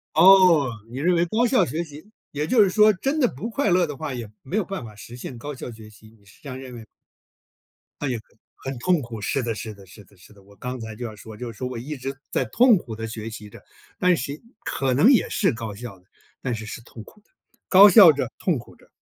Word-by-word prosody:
哦， 180 Hz, -8 st, +7 dB, 0.2 s
你 125 Hz, -, -8 dB
认 175 Hz, +3 st, +2 dB
为 170 Hz, -, +2 dB
高 220 Hz, +8 st, +1 dB
效 235 Hz, -7 st, +3 dB
学 160 Hz, +2 st, -3 dB
习， 155 Hz, +5 st, -13 dB, 0.2 s
也 150 Hz, +1 st, -3 dB
就 220 Hz, +2 st, +5 dB
是 195 Hz, -, +2 dB
说 215 Hz, +2 st, +5 dB
真 275 Hz, +11 st, -2 dB
的 250 Hz, -, +4 dB
不 220 Hz, -, -6 dB
快 225 Hz, -2 st, 0 dB
乐 180 Hz, 0 st, +3 dB
的 145 Hz, -2 st, -6 dB
话， 145 Hz, -1 st, -5 dB
也 115 Hz, -4 st, -6 dB
没 180 Hz, +11 st, -4 dB
有 215 Hz, -, +2 dB
办 195 Hz, -7 st, -6 dB
法 110 Hz, -2 st, -11 dB
实 120 Hz, +3 st, -11 dB
现 125 Hz, 0 st, -8 dB
高 145 Hz, +4 st, -6 dB
效 130 Hz, -, -8 dB
学 110 Hz, -1 st, -13 dB
习， 110 Hz, +1 st, -18 dB
你 100 Hz, -, -28 dB
是 100 Hz, -, -20 dB
这 140 Hz, -, -9 dB
样 130 Hz, -, -6 dB
认 130 Hz, -2 st, -9 dB
为。 115 Hz, -2 st, -10 dB, 1.2 s
哎 145 Hz, -, -1 dB
呀， 120 Hz, -3 st, -2 dB, 0.4 s
很 135 Hz, -1 st, -6 dB
痛 175 Hz, +2 st, +1 dB
苦， 115 Hz, -2 st, -8 dB
是 125 Hz, +6 st, -1 dB
的 115 Hz, -2 st, -2 dB
是 110 Hz, -1 st, -7 dB
的 100 Hz, -1 st, -16 dB
是 95 Hz, +3 st, -15 dB
的 100 Hz, -, -24 dB
是 90 Hz, -, -18 dB
的， 100 Hz, -1 st, -19 dB
我 100 Hz, +1 st, -20 dB
刚 125 Hz, +3 st, -6 dB
才 110 Hz, -1 st, -7 dB
就 120 Hz, -, -6 dB
要 110 Hz, -, -6 dB
说 110 Hz, +1 st, -12 dB
就 120 Hz, +1 st, -6 dB
是 100 Hz, -, -18 dB
说 125 Hz, -, -3 dB
我 125 Hz, -, -7 dB
一 140 Hz, +6 st, -5 dB
直 135 Hz, +1 st, -6 dB
在 -, -, 0 dB
痛 235 Hz, -, +5 dB
苦 115 Hz, -9 st, -8 dB
的 115 Hz, 0 st, -5 dB
学 110 Hz, 0 st, -6 dB
习 105 Hz, -2 st, -9 dB
着， -, -, -14 dB, 0.4 s
但 180 Hz, -1 st, +3 dB
是 140 Hz, +3 st, -4 dB, 0.3 s
可 130 Hz, -2 st, -1 dB
能 205 Hz, -, +5 dB
也 245 Hz, -, +3 dB
是 190 Hz, -, +1 dB
高 110 Hz, -3 st, -6 dB
效 105 Hz, -3 st, -9 dB
的， 90 Hz, -, -29 dB, 0.3 s
但 125 Hz, -3 st, -2 dB
是 110 Hz, -, -6 dB
是 110 Hz, -, -7 dB
痛 115 Hz, -2 st, -12 dB
苦 210 Hz, -, -19 dB
的， -, -, -38 dB, 0.4 s
高 200 Hz, +2 st, +9 dB
效 185 Hz, -4 st, +9 dB
着、 130 Hz, -5 st, -2 dB
痛 170 Hz, -7 st, 0 dB
苦 120 Hz, -, -13 dB
着。 -, -, -24 dB
130 Hz, 280 characters per minute, -23 LUFS, 110-180 Hz, 1.2 s, 高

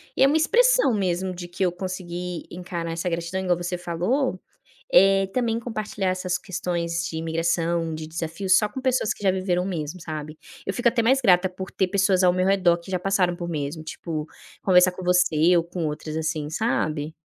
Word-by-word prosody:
E -, -, -1 dB
é -, -, +7 dB
uma 300 Hz, +3 st, +3 dB
expressão 480 Hz, -, +4 dB
mesmo, 185 Hz, -2 st, -1 dB
de 175 Hz, 0 st, -7 dB
que 175 Hz, +2 st, -3 dB
eu 180 Hz, -, +1 dB
consegui 180 Hz, -1 st, -5 dB
encarar 175 Hz, -1 st, -5 dB
essa 170 Hz, +2 st, -2 dB
gratidão, 170 Hz, +2 st, -3 dB
igual 180 Hz, -2 st, +1 dB
a 175 Hz, -, -6 dB
você 175 Hz, +1 st, -2 dB
falou, 180 Hz, -, -1 dB, 0.5 s
eh, 195 Hz, +1 st, +6 dB
também 230 Hz, -2 st, 0 dB
compartilhar 215 Hz, -4 st, -3 dB
essas 185 Hz, 0 st, -1 dB
questões 170 Hz, -2 st, -3 dB
de 160 Hz, -, -5 dB
imigração, 165 Hz, 0 st, -1 dB
de 155 Hz, 0 st, -6 dB
desafios, 170 Hz, +4 st, 0 dB
só 210 Hz, -2 st, +1 dB
com 235 Hz, -, -6 dB
pessoas 255 Hz, -4 st, +1 dB
que -, -, -13 dB
já 190 Hz, -, +4 dB
viveram 185 Hz, -1 st, 0 dB
mesmo, 170 Hz, -2 st, -4 dB
sabe. 155 Hz, -1 st, -6 dB, 0.3 s
Eu 195 Hz, -, -2 dB
fico 240 Hz, 0 st, +1 dB
até 235 Hz, 0 st, +3 dB
mais 260 Hz, +4 st, +3 dB
grata 185 Hz, -5 st, +4 dB
por 185 Hz, 0 st, -8 dB
ter 190 Hz, -, 0 dB
pessoas 195 Hz, -1 st, +2 dB
ao 180 Hz, -, +6 dB
meu 185 Hz, 0 st, +1 dB
redor 185 Hz, -3 st, +3 dB
que 170 Hz, +2 st, -11 dB
já 185 Hz, -, 0 dB
passaram 185 Hz, -2 st, +1 dB
por 175 Hz, 0 st, -5 dB
mesmo, 150 Hz, 0 st, -4 dB
tipo, 155 Hz, -1 st, -5 dB, 0.3 s
conversar 185 Hz, -1 st, +5 dB
com 180 Hz, +1 st, -9 dB
você 180 Hz, -1 st, +4 dB
ou 170 Hz, -, +2 dB
com 170 Hz, 0 st, -4 dB
outras, 155 Hz, +1 st, -5 dB
assim, 155 Hz, -1 st, -2 dB
sabe? 155 Hz, -6 st, -1 dB
180 Hz, 200 wpm, -24 LUFS, 170-195 Hz, 0.5 s, é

